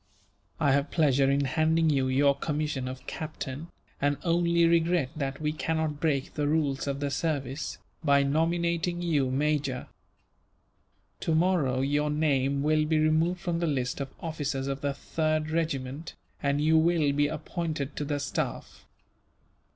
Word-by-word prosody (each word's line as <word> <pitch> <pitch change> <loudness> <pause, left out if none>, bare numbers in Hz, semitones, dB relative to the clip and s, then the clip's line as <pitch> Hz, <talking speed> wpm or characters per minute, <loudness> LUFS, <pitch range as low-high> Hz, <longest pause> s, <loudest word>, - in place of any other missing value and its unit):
"I 140 - +3
have 140 +2 +2
pleasure 140 -4 +3
in 140 +1 +2
handing 160 +4 +2
you 135 -2 +1
your 140 +2 +4
commission 145 -2 -2
of 130 0 -7
captain, 155 -1 -6 0.3
and 145 0 +2
only 170 -1 +3
regret 165 -4 +2
that 135 -2 -3
we 150 -1 0
cannot 155 -1 -1
break 145 -4 0
the 150 -1 -1
rules 145 -3 0
of 140 0 -2
the 140 -1 -1
service, 140 -2 -2 0.3
by 140 -2 +4
nominating 170 +3 0
you 145 -6 +1
major. 140 -1 0 1.3
Tomorrow 160 -6 +2
your 145 +2 +1
name 140 -2 +1
will 155 0 +3
be 155 0 +1
removed 160 +3 +2
from 175 -3 -1
the 170 - 0
list 130 -2 -1
of 135 - -4
officers 145 -4 -3
of 135 0 -3
the 140 -1 -1
3rd 155 +1 -1
Regiment, 155 -2 -2 0.3
and 140 0 +1
you 160 +1 +4
will 160 -3 +3
be 145 +1 +2
appointed 155 -1 -4
to - - -1
the 145 0 -2
staff. 145 - -4
150 Hz, 150 wpm, -28 LUFS, 140-160 Hz, 1.3 s, your